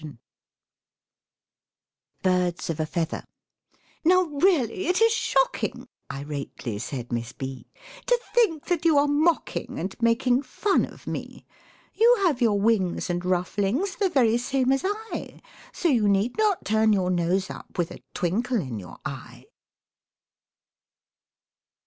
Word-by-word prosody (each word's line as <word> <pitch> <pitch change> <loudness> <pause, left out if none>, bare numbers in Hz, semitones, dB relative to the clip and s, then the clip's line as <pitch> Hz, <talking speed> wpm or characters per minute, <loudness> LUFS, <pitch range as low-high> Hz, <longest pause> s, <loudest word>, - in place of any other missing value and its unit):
BIRDS 180 -2 +1
OF 160 - -5
A 155 - +1
FEATHER 165 0 -2 0.8
"Now 365 +2 +5
really 320 - +1
it 360 +1 +2
is 455 0 +5
shocking!" - - 0 0.2
irately 140 -6 -5
said 120 -1 -5
Miss 115 0 -3
B, 130 -2 -7 0.4
"To - - +3
think 350 -11 +2
that 350 -3 0
you 325 -3 +4
are 285 - +5
mocking 310 +4 0
and 185 +4 -4
making 245 +2 +3
fun 380 +9 +1
of - - -15
me. - - -6 0.5
You 475 +2 +5
have 300 -9 +2
your 215 -4 +3
wings 200 -5 +1
and 175 0 -1
rufflings 195 - 0
the 395 -2 +2
very 240 -7 +3
same 260 +1 +1
as 270 - +2
I, 425 +3 -4 0.3
So 355 - -1
you 230 -9 +3
need 200 +5 +1
not 425 -4 +1
turn 220 0 +3
your 185 -2 +1
nose 180 +2 0
up, - - -11
with 175 -1 -1
a - - -10
twinkle 230 +8 0
in 130 - -4
your 90 -3 -11
eye." - - -8
230 Hz, 135 wpm, -25 LUFS, -, 0.8 s, Now